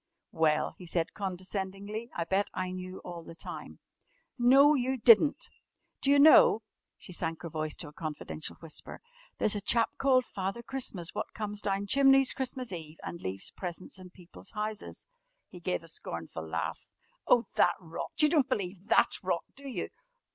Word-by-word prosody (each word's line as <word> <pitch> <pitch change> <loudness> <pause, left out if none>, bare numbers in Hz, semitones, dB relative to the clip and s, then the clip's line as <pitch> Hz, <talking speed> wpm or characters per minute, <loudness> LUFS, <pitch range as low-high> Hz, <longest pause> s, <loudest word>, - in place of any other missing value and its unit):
"Well?" 155 -1 +2
he 180 - -10
said 165 -1 -1
condescendingly, 195 +3 -4
"I 170 - 0
bet 195 +4 +1
I 185 -1 -2
knew 185 0 -7
all 175 -1 -7
the 165 - -11
time." - - -8 0.6
"No, 270 +4 +6
you 260 -1 0
didn't! 235 +5 +6 0.5
D'you 280 +1 +4
know," 280 -6 +7 0.3
she 180 - -10
sank 165 -1 -3
her 170 - -4
voice 155 0 -3
to 165 - -6
a - - -17
confidential 155 0 -5
whisper, 165 -2 -4 0.4
"there's 215 - +2
a 205 - -2
chap 230 +3 +2
called 260 -2 +4
Father 195 +3 -4
Christmas 210 -10 -4
wot - - -4
comes 210 -1 -3
down 200 0 -1
chimneys 270 +3 +5
Christmas 255 -2 -3
Eve 160 -3 -7
and 170 - -6
leaves 95 +1 -4
presents 180 +1 -6
in 185 -1 -11
people's 180 +1 -12
houses?" 215 -1 -5 0.4
He 180 - -11
gave 175 -1 -2
a - - -13
scornful 80 - -6
laugh. 80 0 -3 0.4
"Oh, 235 -1 +5
that - - +4
rot! 165 -2 -6
You 300 - +6
don't 290 -4 +3
believe 190 0 -3
that - - +5
rot, - - -1
do 280 0 -8
you?" 255 - -3
190 Hz, 170 wpm, -30 LUFS, 170-235 Hz, 0.6 s, know